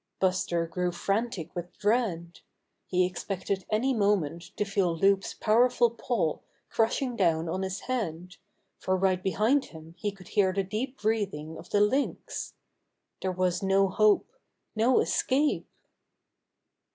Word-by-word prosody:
Buster 185 -2 +1
grew 180 +1 -2
frantic 195 0 -2
with 175 0 -6
dread. 200 -6 0 0.5
He 180 0 +2
ex 180 0 -5
pected 190 -1 -3
any 245 +5 +1
moment 195 - +1
to 210 - 0
feel 195 -4 0
Loup's 195 +2 +2
powerful 240 +2 +3
paw 230 - -1 0.3
crushing 240 +3 +1
down 170 -5 +2
on 185 +4 -2
his 190 +1 -3
head, 180 -8 -4 0.4
for 185 0 0
right 185 -1 +1
be 190 - -1
hind 255 +7 +2
him 160 0 -12
he 205 - -1
could 190 -3 -15
hear 190 -3 +2
the 195 +1 0
deep 230 +8 -4
breathing 200 -8 -1
of - - -11
the 205 - +2
Lynx. 265 +7 -1 0.7
There 190 - 0
was 180 -1 0
no 195 0 +3
hope 215 +2 +3 0.2
— - - -51
no 235 +4 +4
escape! 285 +3 +1
195 Hz, 145 wpm, -28 LUFS, 180-220 Hz, 0.7 s, no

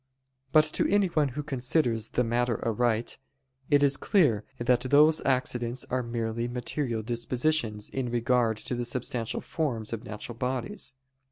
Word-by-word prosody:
But 155 -1 +6
to - - +1
anyone 180 -7 +3
who 140 +3 -5
considers 125 -4 0
the 125 - +1
matter 120 0 0
aright, 115 +1 0 0.5
it 145 -1 +4
is 140 -1 +4
clear 140 - +2
that 120 0 +2
those 150 +4 +5
accidents 125 -2 0
are 130 0 +1
merely 115 -1 -2
material 120 -1 -2
dispositions 120 -1 0
in 130 -2 -3
regard 120 -1 +1
to 110 - -4
the 120 0 -2
substantial 120 -1 -3
forms 120 -9 -3
of 115 0 -4
natural 115 +1 -7
bodies. 130 +6 -3
125 Hz, 145 wpm, -28 LUFS, 115-135 Hz, 0.5 s, But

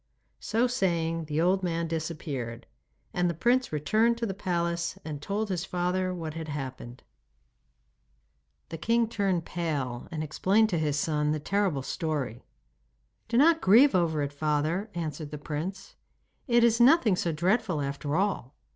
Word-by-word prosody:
So 230 +3 +1
saying 170 -8 0
the 150 0 -2
old 185 +3 +3
man 170 -2 -1
disappeared, 155 -7 -4 0.5
and 180 0 +1
the 170 - -2
prince 245 +9 +2
returned 215 +10 +2
to 235 - -2
the 195 - -3
palace 170 -3 -2
and 150 -3 -5
told 205 +6 -2
his 180 -2 -1
father 180 0 -1
what 165 -4 -5
had 160 0 -6
happened. 130 -4 -6 1.7
The 165 - -6
king 230 +5 +2
turned 195 -6 0
pale 145 -8 -3
and 155 -2 -4
explained 195 +8 +2
to 175 -5 0
his 150 -2 0
son 150 -1 +1
the 155 - -2
terrible 185 -4 0
story. 145 -8 -3 0.8
'Do 235 +1 0
not 325 +4 +5
grieve 240 +9 +6
over 160 -4 +1
it, 140 0 -4
father,' 155 +7 -1
answered 155 -3 -4
the 150 - -6
prince. 165 +6 -5 0.5
'It 240 -2 +4
is 235 0 +4
nothing 245 - +6
so 175 -1 -1
dreadful 175 +1 +1
after 140 +1 -3
all! 185 -8 -1
170 Hz, 155 wpm, -28 LUFS, 150-200 Hz, 1.7 s, grieve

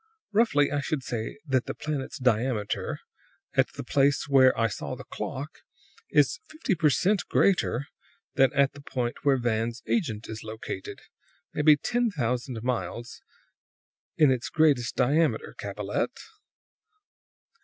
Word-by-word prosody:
Roughly, 205 -10 +3
I 145 - 0
should 140 -1 -2
say 115 0 -4
that 130 -4 0
the - - -4
planet's 150 -3 -4
diameter, 120 -3 0 0.5
at - - +2
the - - -6
place 140 0 +2
where 130 -3 +5
I 115 - +3
saw 105 - -3
the - - -9
clock, - - -6 0.5
is 145 -3 +3
fifty 310 -9 -1
per 155 -3 +3
cent 185 - +2
greater 140 -9 +2 0.5
than 135 -2 +4
at 140 -1 +3
the 145 - -12
point 125 -4 -3
where 140 -2 +4
Van's 115 -1 -1
agent 115 - -1
is 110 0 -7
located; 110 -3 -7 0.5
maybe 150 0 +5
ten 240 +9 0
thousand 125 - -2
miles 120 -1 -3 1.0
in 150 -4 +6
its 125 -2 -1
greatest 145 -6 +2
diameter, 160 - +1
Capellette. - - -3
135 Hz, 135 wpm, -27 LUFS, 120-150 Hz, 1.0 s, in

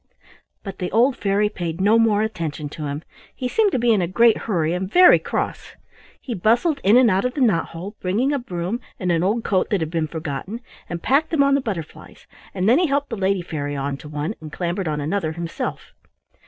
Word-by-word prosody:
But 195 -2 -8
the 180 - -3
old 245 +5 +3
fairy 205 -2 +1
paid 175 -5 -5
no 210 +4 +4
more 215 -2 +3
attention 160 -8 -4
to 150 0 -6
him. 145 +3 -5 0.3
He 255 - -3
seemed 415 - +2
to - - +2
be 240 -1 +2
in 205 - +2
a 175 - 0
great 230 +5 +4
hurry 165 -5 +1
and 185 +2 -3
very 360 0 +7
cross. - - -4 0.4
He 250 - -5
bustled 240 - +1
in 205 +5 +6
and 250 -4 +5
out 190 +1 +1
of 250 0 -2
the 285 - -2
knot 205 -10 +2
hole, 185 +6 -8
bringing 225 +10 0
a 285 - 0
broom 185 -1 -4 0.2
and 180 -2 0
an 165 -1 +2
old 210 +5 0
coat 190 -3 0
that 205 - +1
had 160 -1 -3
been 165 -2 -1
forgotten, 160 - -5 0.3
and 170 -1 -5
packed 290 +4 +2
them 305 -4 +3
on 280 0 +3
the 280 - +2
butterflies, 190 - -7 0.3
and 185 0 -1
then 245 +7 +5
he 355 - +2
helped 280 -1 -1
the - - -1
lady 195 -2 0
fairy 145 -3 -4
on 140 0 -2
to 150 - -11
one, 150 +6 -3
and 155 -1 -9
clambered 175 +2 -3
on 150 -1 -1
another 160 +2 -2
himself. 170 0 -5
195 Hz, 225 wpm, -22 LUFS, 165-235 Hz, 0.4 s, very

